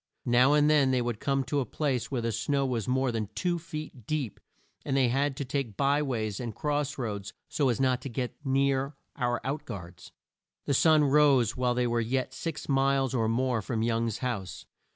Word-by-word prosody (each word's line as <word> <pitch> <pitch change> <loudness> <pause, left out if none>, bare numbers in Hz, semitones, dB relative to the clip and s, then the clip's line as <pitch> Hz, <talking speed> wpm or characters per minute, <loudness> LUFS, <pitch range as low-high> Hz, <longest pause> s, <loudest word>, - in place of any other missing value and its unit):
Now 125 +4 +5
and 150 0 +4
then 150 -3 +4
they 130 -1 +2
would 120 -3 -3
come 135 -1 0
to 140 +3 -1
a 135 - 0
place 135 -1 -1
where 125 -4 -2
the 115 - 0
snow 140 +4 0
was 120 -5 -2
more 130 0 +1
than 110 -3 -3
two 175 -1 0
feet 155 -8 -8
deep, 145 -9 -2 0.4
and 135 -1 0
they 130 -3 +4
had 135 +2 0
to 140 - -3
take 130 -6 -3
by 140 +1 +2
ways 110 -8 -2
and 120 -3 -5
cross 150 -1 -1
roads 105 -6 -4
so 140 -3 +1
as 120 - 0
not 130 -2 +2
to 135 - -5
get 125 0 -3
near 135 0 +1 0.2
our 120 -2 0
out 140 +3 -3
guards. 90 -6 -9 0.5
The 140 - +1
sun 155 +2 +5
rose 140 -5 +4
while 125 -1 +1
they 125 0 +1
were 120 -1 +1
yet 130 +3 -1
six 165 -2 -5
miles 135 -1 +2
or 115 -3 +1
more 125 0 +1
from 110 +2 -2
Young's 115 -1 0
house. 100 -8 -4
130 Hz, 205 wpm, -29 LUFS, 120-140 Hz, 0.5 s, Now